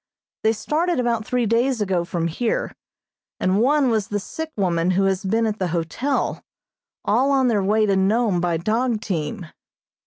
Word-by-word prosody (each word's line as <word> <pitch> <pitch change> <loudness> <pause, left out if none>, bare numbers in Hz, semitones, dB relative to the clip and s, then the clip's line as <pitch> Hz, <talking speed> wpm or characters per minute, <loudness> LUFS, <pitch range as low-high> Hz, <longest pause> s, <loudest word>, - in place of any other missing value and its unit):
They 220 +1 +3
started 310 +8 -1
about 235 -2 0
three 250 -1 +1
days 235 +3 +1
ago 190 -4 0
from 170 -2 -2
here, 220 +8 -2 0.7
and 190 +3 +2
one 275 0 +3
was 215 -3 0
the 205 - -2
sick 320 +10 -6
woman 175 -3 +1
who 185 +1 +2
has 195 0 0
been 225 +4 +1
at 215 -1 -2
the 185 - 0
hotel, 175 - -2 0.6
all 245 +7 +2
on 265 -2 +3
their 210 -4 +2
way 215 +3 +2
to 200 -2 +2
Nome 195 -1 +2
by 170 -1 0
dog 225 +6 0
team. 185 -1 -3
215 Hz, 175 wpm, -22 LUFS, 190-240 Hz, 0.7 s, They